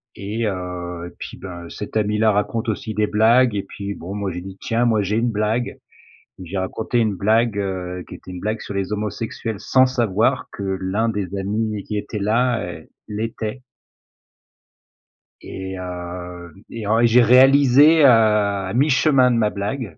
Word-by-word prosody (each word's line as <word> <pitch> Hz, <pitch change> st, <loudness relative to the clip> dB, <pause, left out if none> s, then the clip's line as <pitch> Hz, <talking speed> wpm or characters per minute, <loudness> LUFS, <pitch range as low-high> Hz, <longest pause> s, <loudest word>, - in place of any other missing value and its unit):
Et 105 Hz, +4 st, -3 dB
heu, 90 Hz, -3 st, -4 dB
et -, -, -14 dB
puis -, -, -8 dB
ben, 85 Hz, -3 st, -8 dB
cet 105 Hz, +1 st, -5 dB
ami 105 Hz, 0 st, 0 dB
là 110 Hz, 0 st, +4 dB
raconte 110 Hz, +3 st, -1 dB
aussi 110 Hz, +1 st, -3 dB
des 105 Hz, 0 st, +1 dB
blagues, 115 Hz, +2 st, +4 dB
et 100 Hz, -, -1 dB
puis 100 Hz, 0 st, -6 dB
bon, 90 Hz, +4 st, -7 dB
moi 100 Hz, -2 st, -3 dB
j'ai 90 Hz, +1 st, -6 dB
dit: 95 Hz, +1 st, -10 dB
«Tiens 115 Hz, +2 st, 0 dB
moi 110 Hz, -3 st, +2 dB
j'ai 105 Hz, +3 st, -1 dB
une 120 Hz, +1 st, +1 dB
blague» 110 Hz, +3 st, -1 dB, 0.6 s
et 95 Hz, -, -8 dB
j'ai 95 Hz, +3 st, -5 dB
raconté 110 Hz, +5 st, -1 dB
une 110 Hz, -3 st, +1 dB
blague, 110 Hz, +3 st, +2 dB
heu, 90 Hz, -2 st, -4 dB
qui -, -, -9 dB
était -, -, -11 dB
une 90 Hz, -, -7 dB
blague 110 Hz, +3 st, -3 dB
sur -, -, -7 dB
les 100 Hz, 0 st, -3 dB
homosexuels 110 Hz, 0 st, -4 dB
sans 130 Hz, +4 st, +4 dB
savoir 120 Hz, 0 st, 0 dB
que 100 Hz, -, -7 dB
l'un 95 Hz, +3 st, -1 dB
des 100 Hz, -3 st, -3 dB
amis 105 Hz, +1 st, -2 dB
qui 105 Hz, -, -4 dB
était 105 Hz, +1 st, -4 dB
là, 115 Hz, +1 st, +1 dB
heu, 85 Hz, -3 st, -9 dB, 0.2 s
l'était. 110 Hz, +2 st, -4 dB, 1.8 s
Et 95 Hz, 0 st, -7 dB
hem 90 Hz, -1 st, -7 dB, 0.2 s
et 115 Hz, -3 st, -6 dB
en 110 Hz, +2 st, +3 dB
et 120 Hz, -, +5 dB
j'ai 120 Hz, +2 st, +5 dB
réalisé, 135 Hz, +5 st, +6 dB
heu, -, -, +8 dB
à 105 Hz, -5 st, +3 dB
mi-chemin 135 Hz, -1 st, +4 dB
de 120 Hz, -, +1 dB
ma 110 Hz, -2 st, +2 dB
blague, 105 Hz, -, -5 dB
105 Hz, 180 wpm, -21 LUFS, 95-115 Hz, 1.8 s, heu